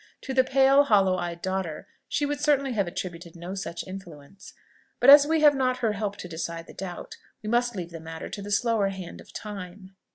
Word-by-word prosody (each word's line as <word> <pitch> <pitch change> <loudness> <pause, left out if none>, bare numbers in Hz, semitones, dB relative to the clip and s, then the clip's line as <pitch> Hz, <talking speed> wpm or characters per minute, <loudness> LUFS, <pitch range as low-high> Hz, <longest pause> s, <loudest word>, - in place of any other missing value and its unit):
To 265 - -5
the 260 0 +5
pale, 270 +2 +5
hollow 195 -7 +3
eyed 175 -1 -5
daughter 185 -4 -3 0.2
she 290 - 0
would 290 0 -2
certainly 280 -3 +2
have 200 -5 0
attributed 175 -1 -6
no 175 +2 -7
such 190 -3 -5
influence. 185 -2 -11 0.5
But 250 +3 +8
as 290 0 +9
we 320 0 +2
have 295 -1 +7
not 255 -2 0
her 230 -4 0
help 205 -1 -3
to 180 - -7
decide 165 0 -5
the - - -13
doubt, 180 -2 -7 0.3
we 215 - -4
must 240 0 +1
leave 175 -3 -5
the 165 - -7
matter 160 0 -7
to 200 - -7
the 200 - -7
slower 210 -1 +2
hand 190 -3 -8
of - - -16
time. 195 -2 -8
195 Hz, 215 wpm, -26 LUFS, 175-255 Hz, 0.5 s, as